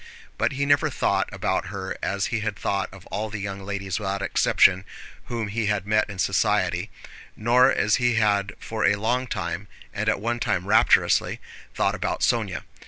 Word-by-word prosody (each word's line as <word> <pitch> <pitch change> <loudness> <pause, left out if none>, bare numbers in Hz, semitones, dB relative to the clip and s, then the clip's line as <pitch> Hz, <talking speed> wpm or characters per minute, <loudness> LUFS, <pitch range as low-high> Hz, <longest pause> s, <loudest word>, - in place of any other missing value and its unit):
But - - 0
he 140 +1 -1
never 145 0 +3
thought - - 0
about - - -1
her 95 0 -5
as 100 -1 -1
he 115 - +1
had 105 -1 -2
thought 100 -1 -2
of 95 -2 -13
all 110 +1 -2
the 110 - -5
young 100 -1 -5
ladies 95 0 -3
without 100 -1 -3
exception 95 -1 +3 0.4
whom 115 -3 -3
he 110 +1 -1
had 105 -2 0
met 110 +1 +1
in 100 - -7
society, 90 - +1 0.5
nor 125 +4 +4
as 105 - +2
he 120 -1 +2
had 100 -3 +1
for 110 -1 -4
a 100 - +4
long 125 +5 -1
time, 95 -2 -4 0.3
and 110 +1 -1
at 110 - +1
one 120 +3 -2
time 90 -5 -1
rapturously, 110 +3 +3 0.4
thought - - +1
about - - -3
Sónya. - - 0
105 Hz, 180 wpm, -24 LUFS, 100-115 Hz, 0.5 s, nor